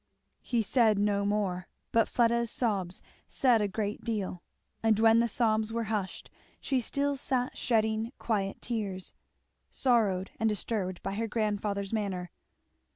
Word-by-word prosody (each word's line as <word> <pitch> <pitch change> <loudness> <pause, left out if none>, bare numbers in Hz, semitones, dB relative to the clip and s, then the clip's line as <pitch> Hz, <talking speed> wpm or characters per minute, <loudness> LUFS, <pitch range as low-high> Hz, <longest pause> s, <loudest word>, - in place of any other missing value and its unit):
He 235 -3 0
said 220 -1 +4
no 200 0 +2
more; 195 -3 -1 0.2
but 230 -1 +4
Fleda's 235 -1 +2
sobs 195 -7 -1 0.2
said 245 -4 +3
a 205 - +2
great 205 +1 -3
deal. 205 -6 -2 0.4
And 220 -2 +3
when 225 0 +6
the 235 - +3
sobs 220 -1 +1
were 230 0 -1
hushed, 195 -3 -3 0.3
she 265 - 0
still 280 +4 -1
sat 255 -2 -1
shedding 220 -1 +1
quiet 200 -4 -2
tears, 200 -6 -3 0.6
sorrowed 210 -7 +2
and 220 -1 +3
disturbed 195 -3 -2
by 195 - -2
her 225 +3 -1
grandfather's 205 -2 -1
manner. 190 -5 -2
215 Hz, 140 wpm, -30 LUFS, 200-230 Hz, 0.6 s, when